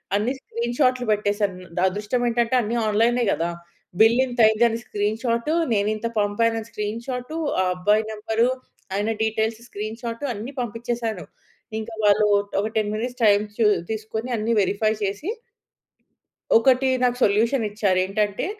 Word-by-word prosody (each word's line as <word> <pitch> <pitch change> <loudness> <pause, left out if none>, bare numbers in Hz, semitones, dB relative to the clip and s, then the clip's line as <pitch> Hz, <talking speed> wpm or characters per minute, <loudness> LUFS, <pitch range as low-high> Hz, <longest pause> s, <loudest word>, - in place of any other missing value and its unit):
అన్ని 215 +6 +1
స్క్రీన్ 235 -1 -4
షాట్లు 255 -2 +2
పెట్టేసాను. 205 -2 0 0.2
ద - - +2
అదృష్టం 210 +6 -2
ఏంటంటే 235 +1 +1
అన్ని 225 +1 -2
ఆన్‌లైనే 230 +3 +2
కదా! 165 +3 -1 0.5
బిల్ 225 +3 +6
ఇంతయిందని 230 -1 +3
స్క్రీన్ 210 +1 -1
షాట్, 235 +2 0 0.2
నేనింత 215 +2 0
పంపానని 225 +2 0
స్క్రీన్ 210 +2 -4
షాట్. 250 +2 -4 0.3
ఆ - - +2
అబ్బాయి 210 +4 +2
నంబర్, 220 +1 -1 0.5
ఆయన 205 +2 0
డీటెయిల్స్ 220 0 -1
స్క్రీన్ 215 +2 -6
షాట్ 230 +1 -5
అన్ని 225 +5 -6
పంపించేసాను. 230 -3 -3 0.6
ఇంకా 225 +1 -7
వాళ్ళు 210 +1 +5 0.4
ఒక 210 - -1
10 210 -1 0
మినిట్స్ 245 +3 -4
టైమ్ 205 0 +5 0.5
తీసుకొని 220 +2 -4
అన్నీ 220 +2 0
వెరిఫై 205 +3 +1
చేసి 205 - -3 1.3
ఒకటి 260 +3 +3 0.2
నాకు 245 0 +2
సొల్యూషన్ 225 +4 +2
ఇచ్చారు 200 -3 +1
ఏంటంటే 205 +3 -1
220 Hz, 135 wpm, -23 LUFS, 210-235 Hz, 1.3 s, బిల్